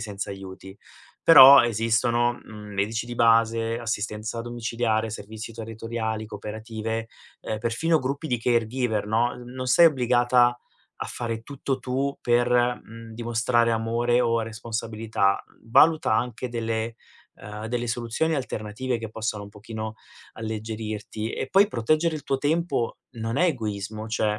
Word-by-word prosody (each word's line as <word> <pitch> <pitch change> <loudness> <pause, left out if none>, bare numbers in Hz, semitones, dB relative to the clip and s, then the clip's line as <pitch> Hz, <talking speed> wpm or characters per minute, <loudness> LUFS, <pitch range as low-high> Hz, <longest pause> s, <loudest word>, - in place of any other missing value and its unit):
senza 105 -2 -5
aiuti. 95 0 -9 0.5
Però 140 -5 +10
esistono, 120 +1 +1
mhmm, 105 -1 -10
medici 110 +4 -1
di 120 - -6
base, 115 0 +3
assistenza 110 -1 -3
domiciliare, 115 -1 -1
servizi 110 +1 -7
territoriali, 110 0 -4
cooperative, 110 +1 -5 0.3
uhm, 110 - -3
perfino 135 +9 +1
gruppi 140 +4 -3
di 125 -5 0
caregiver, 115 -2 0
no, 115 +3 +1
non 130 +1 -6
sei 170 +7 +7
obbligata 120 -3 +3 0.4
a - - -5
fare 115 -2 -4
tutto 135 +1 -3
tu 135 +2 -2
per, 120 0 +2
mhmm, 120 -2 -1
dimostrare 120 +1 +1
amore 115 +2 +1
o 115 -1 +2
responsabilità, 110 -2 -1
mhmm, 115 - -23
valuta 155 -3 +5
anche 125 +2 -2
delle 115 -1 -3 0.4
uhm, 105 +1 -8
delle 120 +1 -2
soluzioni 120 +7 -1
alternative 125 -1 -3
che 115 -1 -6
possano 110 -1 -4
un 100 - -11
pochino 110 +1 -7 0.4
alleggerirti. 110 0 -5
E - - -3
poi, 195 +2 +5
proteggere 155 - +1
il 155 - -7
tuo 135 - 0
tempo 145 -3 -1
non 115 +1 -4
è 180 - +4
egoismo, 110 - -3
cioè, 110 -1 0
115 Hz, 135 wpm, -25 LUFS, 110-120 Hz, 0.5 s, Però